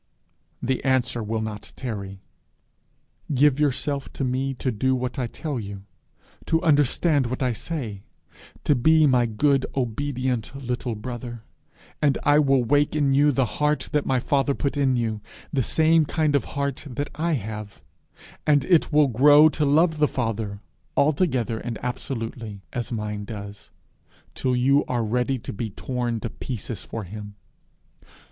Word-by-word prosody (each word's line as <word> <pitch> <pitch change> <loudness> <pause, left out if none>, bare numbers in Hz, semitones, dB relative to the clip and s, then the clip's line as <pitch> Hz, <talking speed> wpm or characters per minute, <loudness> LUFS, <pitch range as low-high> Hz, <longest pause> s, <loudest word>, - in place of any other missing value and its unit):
the 130 +1 -1
answer 130 -3 +1
will 110 +1 -2
not 110 -1 -6
tarry. 100 -6 -6 1.1
'Give 145 +1 +4
yourself 140 -1 -1
to - - -3
me 130 +1 -1
to 130 +1 -1
do 130 +4 +1
what 125 +1 -3
I 125 - 0
tell 145 +2 -4
you, 100 -2 -7 0.6
to 160 - +3
understand 145 -1 +3
what 130 +2 -2
I 125 -2 +1
say, 115 -7 -5 0.6
to - - +4
be 155 +4 +4
my 125 -4 +3
good, 135 +5 +2
obedient 130 -1 -2
little 125 -3 -3
brother, 120 0 -7 0.6
and 145 -2 +3
I 145 +1 +5
will 135 -3 +3
wake 145 +5 +2
in 140 -3 +2
you 145 +2 +5
the 135 -1 +2
heart 150 +5 -1
that 150 -1 0
my 130 -1 +2
father 140 +2 +1
put 140 - -2
in 135 -3 +2
you, 110 -3 -1 0.3
the 135 - +2
same 160 +5 +3
kind 155 0 0
of 140 - +1
heart 140 -1 -3
that 140 +4 -4
I 165 +4 0
have, 105 -4 -5 0.7
and 145 -3 +4
it 170 -3 +3
will 150 -1 +5
grow 145 +5 +7
to 150 0 -1
love 155 +2 +3
the 150 - +4
Father, 110 -5 -3 0.4
altogether 140 - +1
and 115 -2 -5
absolutely, 115 -4 -5
as 120 -1 -3
mine 105 -2 -3
does, 105 -1 -8 0.6
till 130 -1 0
you 135 +3 +4
are 120 -2 -1
ready 125 +4 0
to 115 - -7
be 110 +2 -4
torn 120 +2 -3
to 115 - -4
pieces 120 -4 -6
for 115 - -6
him. 105 +2 -8
130 Hz, 155 wpm, -24 LUFS, 115-145 Hz, 1.1 s, grow